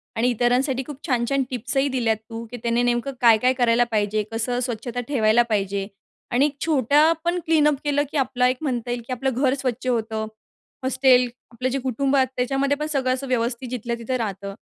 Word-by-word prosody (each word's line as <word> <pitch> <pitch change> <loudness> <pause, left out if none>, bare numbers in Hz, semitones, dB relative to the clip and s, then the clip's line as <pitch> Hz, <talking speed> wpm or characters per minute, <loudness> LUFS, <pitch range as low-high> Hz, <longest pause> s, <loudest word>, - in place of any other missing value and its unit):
आणि 235 +2 +2
इतरांसाठी 250 +3 +1
खूप 290 -3 -7
छान 245 -3 +1
छान 275 -1 +1
टिप्सही 260 +3 -1
दिल्यात 235 -4 0
तू, 230 0 -6
की 245 - -6
त्याने 235 0 +1
नेमकं 245 +3 0
काय 230 -2 +7
काय 255 +1 +4
करायला 240 -1 +4
पाहिजे 210 0 0
कसं 240 +2 -1
स्वच्छता 240 0 -3
ठेवायला 235 -4 +3
पाहिजे. 200 -1 -1 0.4
आणि 270 +5 +3 0.2
छोट्या 300 +1 +4
पण 350 +1 +1
क्लीनअप 300 -2 +3
केलं, 290 0 +1
की - - -2
आपला 250 -2 +2
एक 255 0 0
म्हणता 245 -5 -2
येईल, 245 0 -2
की 255 - -3
आपलं 260 +1 -1
घर 260 +1 +2
स्वच्छ 255 0 -3
होतं. 220 -2 -1 0.6
हॉस्टेल 260 -1 +4 0.2
आपलं 250 +2 -2
जे 275 - -1
कुटुंब 265 +2 0
आहे 265 -1 +4
त्याच्यामध्ये 270 +3 0
पण 300 - -3
सगळं 265 -4 +1
असं 265 +1 -4
व्यवस्थित 245 0 -1
जिथल्या 235 -1 -3
तिथं 235 +2 -3
राहतं. 200 -3 -4
250 Hz, 190 wpm, -23 LUFS, 230-270 Hz, 0.6 s, काय